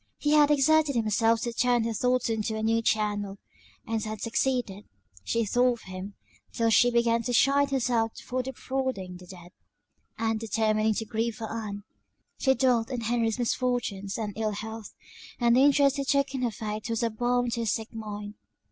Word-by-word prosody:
He 295 - 0
had 300 -1 +6
exerted 295 0 +3
himself 225 0 +2
to 235 - -3
turn 245 0 +2
her 230 0 -2
thoughts 250 +3 +1
into 220 -1 -1
a 220 - -3
new 225 +1 +2
channel, 205 -2 -1 0.5
and 225 -1 -2
had 215 -1 -5
succeeded; 230 -3 -1 0.4
she 230 -1 0
thought 245 +4 +3
of 235 - -10
him 185 +2 -8 0.4
till 230 -1 +1
she 245 +2 +5
began 235 -1 +2
to 245 +2 -3
chide 280 +3 +4
herself 240 -4 0
for 255 0 -3
defrauding 260 -7 -4
the 180 0 -14
dead, 175 -1 -12 0.7
and, 225 0 0
determining 220 0 +1
to 225 - -2
grieve 225 +1 -2
for 225 -2 -6
Ann, 205 -3 -5 0.6
she 265 -1 +3
dwelt 245 -3 +2
on 250 -3 -3
Henry's 230 -1 0
misfortunes 240 -5 -1
and 210 -3 -3
ill 215 -1 -1
health; 220 +1 -7 0.5
and 235 -1 +4
the 255 - +5
interest 280 0 +4
he 275 - -1
took 275 0 +1
in 265 - -3
her 245 - +1
fate 215 0 -5
was 230 0 -1
a 230 - +1
balm 245 +2 0
to 235 - -2
her 230 - -1
sick 220 +2 -2
mind. 210 -2 -6
230 Hz, 185 wpm, -27 LUFS, 215-250 Hz, 0.7 s, had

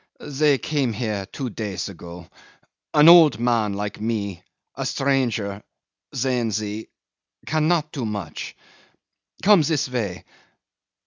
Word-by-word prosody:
"They 145 0 +3
came 135 -5 -1
here 105 -4 -3
two 130 -4 -5
days 100 -5 -4
ago. 85 -2 -10 0.7
An 150 +1 +7
old 165 -9 +8
man 115 -4 +1
like 105 +1 -5
me, 100 -5 -2 0.3
a - - -4
stranger 120 -7 0 0.5
sehen 125 -3 0
Sie 105 +1 -4 0.6
cannot 155 0 +1
do 135 - -4
much.... 105 -8 -5 0.9
Come 205 -3 +6
this 150 -2 0
way. 105 -10 -4
115 Hz, 115 wpm, -23 LUFS, 100-140 Hz, 0.9 s, old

